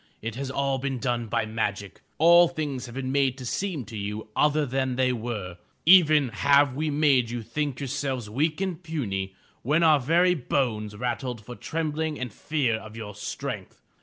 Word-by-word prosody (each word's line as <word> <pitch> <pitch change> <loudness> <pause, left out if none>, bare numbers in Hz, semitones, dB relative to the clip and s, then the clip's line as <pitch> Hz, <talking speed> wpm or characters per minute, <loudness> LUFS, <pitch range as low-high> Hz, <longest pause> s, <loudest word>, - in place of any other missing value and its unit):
It 115 +1 -5
has 135 +3 -4
all 135 0 0
been 135 0 -2
done 120 -2 -1
by 115 0 0
magic. 105 -3 -3 0.2
All 170 +2 +7
things 145 -6 -4
have 120 - -10
been 130 -1 -3
made 135 -2 +2
to 130 - -8
seem 165 - -2
to 110 - -10
you 105 +1 -5
other 150 0 +3
than 130 -1 -1
they 130 0 +2
were. 105 -7 -5 0.3
Even 155 -6 +6
have 140 +5 +3
we 155 +3 -1
made 140 -5 +3
you 120 -1 -4
think 135 +3 -3
yourselves 130 -3 -3
weak 150 +9 0
and 185 -3 -2
puny, 100 - -3 0.3
when 155 +6 +2
our 155 -3 +6
very 170 +7 +3
bones 120 -8 -1
rattled 120 -1 -3
for 125 - -8
trembling 160 0 -3
and 125 -4 -5
fear 135 -7 0
of 110 0 -11
your 105 -2 -7
strength. 105 +1 -6
130 Hz, 180 wpm, -26 LUFS, 115-150 Hz, 0.3 s, All